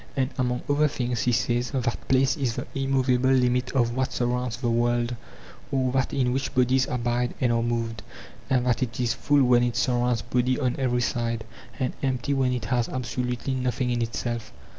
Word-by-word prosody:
And 130 0 +1
among 125 -1 -1
other 145 +1 +3
things 125 -4 -2
he 125 - +2
says 120 +1 +1
that 125 -3 -2
place 135 +2 +3
is 130 -6 -1
the - - -4
immovable 130 -1 +1
limit 125 -1 +2
of 120 -3 +1
what 130 0 0
surrounds 125 -1 -1
the 120 -1 -2
world, 120 +1 +1 0.6
or 130 -2 +1
that 130 -1 0
in 125 -3 +1
which 135 +1 -2
bodies 130 +1 +3
abide 120 0 -1
and 125 -2 +2
are 115 - +2
moved; 115 -2 -2 0.5
and 125 -2 +2
that 120 -2 +1
it 120 -2 -2
is 120 -2 +1
full 145 +3 +2
when 125 -1 +5
it 120 -1 0
surrounds 120 -2 +1
body 125 +1 +1
on 125 -3 0
every 125 -2 +1
side, 115 -1 -1 0.3
and 130 -2 -1
empty 130 0 0
when 130 -2 +1
it 125 -1 -2
has 120 -2 0
absolutely 125 +1 -3
nothing 125 -1 -1
in 120 -1 0
itself. 115 0 -3
125 Hz, 190 wpm, -26 LUFS, 120-130 Hz, 0.6 s, when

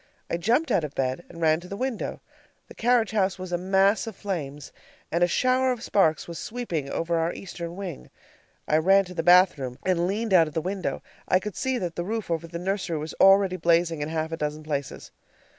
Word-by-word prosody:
I - - +1
jumped 240 - +1
out 190 -6 +2
of 150 -2 -6
bed 130 +5 -2
and 170 - -11
ran 160 0 +3
to 175 - -12
the 200 - -6
window. 255 -2 -3 0.5
The - - -10
carriage 235 -3 +2
house 195 -4 +1
was 185 -1 -7
a 175 - +1
mass 195 +4 +2
of 220 - -6
flames, 150 -9 -5 0.4
and 170 +2 +2
a - - +5
shower 255 +6 +2
of 240 -2 -4
sparks 160 -9 +2
was 170 -1 -7
sweeping 180 - -4
over 165 +2 -1
our 165 +1 0
eastern 170 -2 -7
wing. 190 - -7 0.6
I 155 - +3
ran 195 +4 +4
to 180 - -10
the 170 - -1
bathroom 165 -8 +4
and 175 -2 +1
leaned 210 +2 -1
out 165 -3 +6
of 155 - -10
the - - +2
window. 185 +3 -3 0.2
I 185 - +4
could 210 0 -6
see 260 -1 -1
that 175 -6 -4
the 175 - -2
roof 215 -1 -3
over 165 0 -2
the 170 0 -6
nursery 185 -2 -2
was 155 +1 -5
already 195 -1 +6
blazing 165 -2 +2
in 145 - -2
half 160 0 -2
a 165 - -3
dozen 150 0 -3
places. 145 -3 -4
175 Hz, 220 wpm, -26 LUFS, 160-200 Hz, 0.6 s, out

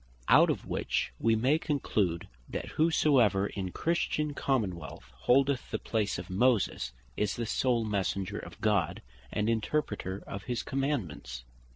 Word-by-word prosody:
Out - - +7
of - - -1
which - - -1
we 115 0 +3
may 130 +8 +3
conclude, 105 - 0 0.2
that - - -4
whosoever 135 - +3
in 100 -2 -3
a - - -7
Christian 155 - 0
Common 120 -10 0
wealth 70 -6 -10
holdeth 135 - +2
the - - -1
place 105 -3 -1
of 90 0 -6
Moses, 100 - +1 0.2
is 105 -1 0
the 120 - -2
sole 120 0 +1
Messenger 100 -2 -1
of - - -10
God, 100 -6 +1 0.3
and 105 0 0
Interpreter 110 -4 -1
of 100 +1 -7
his 120 -2 -2
Commandements. 95 - -3
110 Hz, 150 wpm, -30 LUFS, 95-135 Hz, 0.3 s, Out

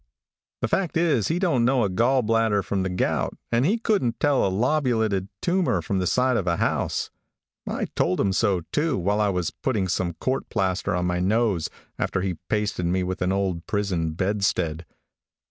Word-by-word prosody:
The - - +1
fact 180 -4 0
is, 155 - +2
he 165 - 0
don't 170 -10 +2
know 125 +1 +3
a 100 - +1
gall 120 +7 +2
bladder 110 -2 +2
from 100 0 -1
the 95 - -1
gout, 90 - -1
and 120 +4 +3
he 215 +5 +2
couldn't 205 - 0
tell 145 -2 +3
a - - +2
lobulated 110 -3 +1 0.2
tumor 180 0 +2
from 100 -4 -2
the 90 - 0
side 125 +2 +2
of 95 - -2
a 85 -1 +1
house. - - -1 0.6
I - - -2
told 90 - +1
him 100 -1 +2
so, 100 -3 +2
too, 150 -3 +1
while 100 +3 +1
I 105 - +2
was 90 -3 -1
putting 110 -8 -1
some 90 -1 -1
court 130 +9 -2
plaster 95 -2 0
on 90 0 0
my 90 0 0
nose, 100 -2 +1 0.3
after 95 - -1
he 90 -3 -3
pasted 105 -4 0
me 90 +1 +1
with 95 +1 -4
an 90 +1 +1
old 95 -3 -1
prison 90 -6 -1
bedstead. 90 -4 -1
100 Hz, 190 wpm, -24 LUFS, 90-125 Hz, 0.6 s, know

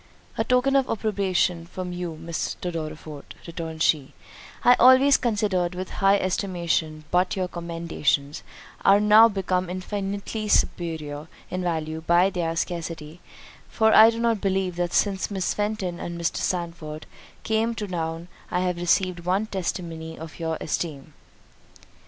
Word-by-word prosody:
"A - - 0
token 255 +2 +2
of 270 -2 +2
approbation 190 -5 0
from 180 0 -6
you, 175 -3 -5
Mr. 170 +2 -4
Dorriforth," 155 -2 -7
returned 165 -2 -4
she, 145 -4 +1 0.5
"I 245 - +7
always 260 +3 +7
considered 205 -7 0
with 185 +1 -5
high 195 +1 +5
estimation—but 180 -1 -1
your 185 -2 -1
commendations 165 -4 -2 0.4
are 195 +1 +6
now 210 +2 +7
become 185 -3 -1
infinitely 200 +3 -4
superior 160 -6 0 0.2
in 185 - -2
value 160 -2 -2
by 175 +4 +3
their 170 -3 -2
scarcity; 165 -2 -4 0.5
for 220 -1 +3
I 220 +1 +9
do 230 0 -3
not 230 -3 +1
believe 190 -2 0
that 175 -1 -1
since 195 -2 +1
Miss 190 -3 -1
Fenton 205 -4 -2
and 170 0 -5
Mr. 170 - -1
Sandford 170 -3 -3 0.4
came 225 +1 0
to 215 - -4
town, 165 -1 -4 0.2
I 180 - 0
have 180 -1 -1
received 175 +1 +1
one 185 +5 0
testimony 170 -5 -5
of 160 +1 -10
your 160 -1 -2
esteem." 155 -2 -4
180 Hz, 140 wpm, -25 LUFS, 165-200 Hz, 0.5 s, I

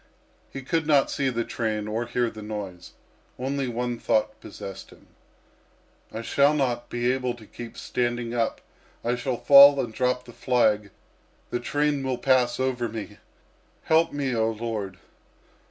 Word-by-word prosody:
He 135 - -8
could 160 +3 -1
not 145 -3 +4
see 135 -2 0
the 120 -2 -1
train 110 -3 -3
or 110 +2 -2
hear 120 -1 0
the 110 - -10
noise. 100 -4 -7 0.4
Only 135 +1 -2
one 120 0 -3
thought 110 0 0
possessed 95 0 -9
him. - - -18 1.1
"I 110 +1 -5
shall 140 +5 +3
not 120 -4 -1
be 120 +1 0
able 125 -2 -1
to 115 -3 -14
keep 120 +2 -10
standing 120 -1 -2
up. 115 -1 -1 0.4
I 120 +1 +1
shall 125 0 -2
fall 140 +1 +8
and 120 -4 -2
drop 125 +1 0
the 120 - -12
flag; 110 -5 +1 0.6
the 120 - -1
train 145 +3 0
will 130 -1 -1
pass 130 -2 +2
over 125 -3 -1
me. 105 -4 -7 0.6
Help 160 +1 +3
me, 140 -3 -2
oh 110 0 +2
Lord!" 110 -4 -4
120 Hz, 155 wpm, -25 LUFS, 110-130 Hz, 1.1 s, fall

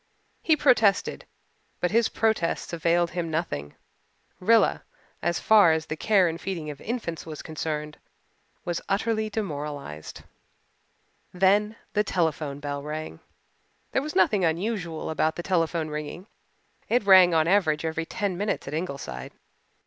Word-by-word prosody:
He 320 - +4
protested, 225 -9 +3 0.5
but 180 - 0
his 230 +1 +3
protests 220 -7 0
availed 170 +1 +1
him 175 -2 -3
nothing. 115 - -3 0.6
Rilla, 225 +4 +3 0.4
as 170 -1 0
far 205 -7 +6
as 160 -1 -1
the 155 - -4
care 195 +2 +3
and 165 +1 -4
feeding 165 -6 -4
of 140 - -11
infants 220 -8 -4
was 155 -2 -8
concerned, 150 -1 -4 0.7
was 175 -1 -2
utterly 215 +2 0
demoralized. 145 - -5 1.1
Then 200 +4 +2 0.2
the 210 - +2
telephone 160 -7 -1
bell 145 -1 -4
rang. 150 - -6 0.7
There 265 - +1
was 300 +2 -6
nothing 190 +1 +3
unusual 170 -1 -1
about 160 +1 +1
the 175 - -5
telephone 165 -3 0
ringing. 150 +4 -6 0.6
It 245 -2 +2
rang 185 -3 +7
on 160 -1 +4
an 175 - +3
average 160 -6 +2
every 160 0 -2
ten 200 -4 -2
minutes 205 -3 -2
at 140 - -5
Ingleside. 140 - -5
170 Hz, 140 wpm, -26 LUFS, 155-200 Hz, 1.1 s, rang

